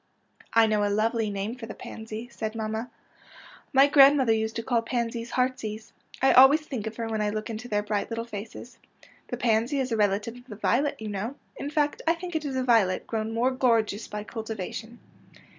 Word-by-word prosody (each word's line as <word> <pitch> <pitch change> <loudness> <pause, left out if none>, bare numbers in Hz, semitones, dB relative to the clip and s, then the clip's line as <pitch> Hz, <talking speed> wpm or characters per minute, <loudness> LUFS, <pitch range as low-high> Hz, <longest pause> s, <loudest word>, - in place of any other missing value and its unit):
'' - - -27
I - - +6
know 215 -1 +1
a 205 - +1
lovely 220 +1 +1
name 200 +2 -3
for 240 -3 -8
the - - -8
pansy," 220 +1 -7
said 220 -2 -4
manmia. 220 +1 -3 0.4
'' - - -18 0.3
My 270 0 +7
grandmother 275 -4 +6
used 220 0 -1
to 230 - -3
call 235 -1 +1
pansies 235 0 -3
heartsease. 225 -5 -2 0.3
I 265 - +6
always 270 +4 +8
think 255 -8 -5
of 220 - -5
her 230 -1 -3
when 220 -1 -2
I 210 - +1
look 215 +1 -4
into 225 +2 -6
their 210 -2 0
bright 205 -1 -2
little 230 0 -3
faces. 225 +2 -9 0.2
'' - - -25
The 245 - -3
pansy 235 +3 +1
is 260 -2 -2
a - - +2
relative 210 +3 0
of 245 +1 -16
the 215 - -8
violet, 255 +7 0
you 220 - -6
know. 210 +6 -4 0.2
In 285 - -5
fact, 295 -1 0
I 330 - +4
think 350 0 -7
it 310 -1 -1
is 275 -2 -3
a 260 - 0
violet 225 -7 +3
grown 220 -1 -3
more 235 +3 +1
gorgeous 230 -5 +1
by 210 0 -5
cultivation." 220 +1 -6
230 Hz, 215 wpm, -27 LUFS, 215-255 Hz, 0.4 s, always